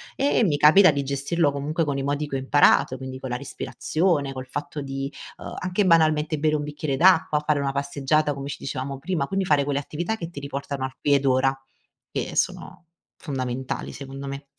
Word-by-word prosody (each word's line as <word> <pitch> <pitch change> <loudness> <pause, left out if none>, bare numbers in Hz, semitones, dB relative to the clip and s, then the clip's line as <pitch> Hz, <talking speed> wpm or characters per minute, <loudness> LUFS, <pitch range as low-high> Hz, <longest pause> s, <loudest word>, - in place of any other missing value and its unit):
e 280 - +1
e - - +4
mi 155 -8 +2
capita 160 +7 +7
di 140 -2 0
gestirlo 140 +3 0
comunque 145 +4 -1
con 145 -2 -1
i - - -2
modi 145 +2 -1
che 140 - -4
ho - - 0
imparato 135 -1 +4
quindi 130 0 -7
con 130 - -6
la 125 - -2
respirazione, 145 +2 -1
col 130 -1 -7
fatto 145 +2 -5
di, 135 0 -4 0.3
ehm, - - -8
anche 185 +2 0
banalmente 155 -3 +3
bere 155 0 +2
un 150 - -1
bicchiere 145 -1 -3
d'acqua, 165 -3 +4
fare 150 -1 +2
una 140 -1 0
passeggiata 140 +2 0
come 140 0 -6
ci - - -5
dicevamo 135 0 -4
prima, 140 0 -2
quindi 195 +3 -1
fare 150 -5 +3
quelle 140 0 -1
attività 175 +9 -3
che 170 -4 -6
ti 145 - -7
riportano 140 -1 -4
al 130 0 -7
qui 145 - +2
ed 140 0 +2
ora, 135 +1 +3 0.6
che - - -3
sono, - - -2 0.4
fondamentali 130 -4 -4
secondo 135 0 -8
me. 140 +1 -6
145 Hz, 205 wpm, -24 LUFS, 135-155 Hz, 0.6 s, capita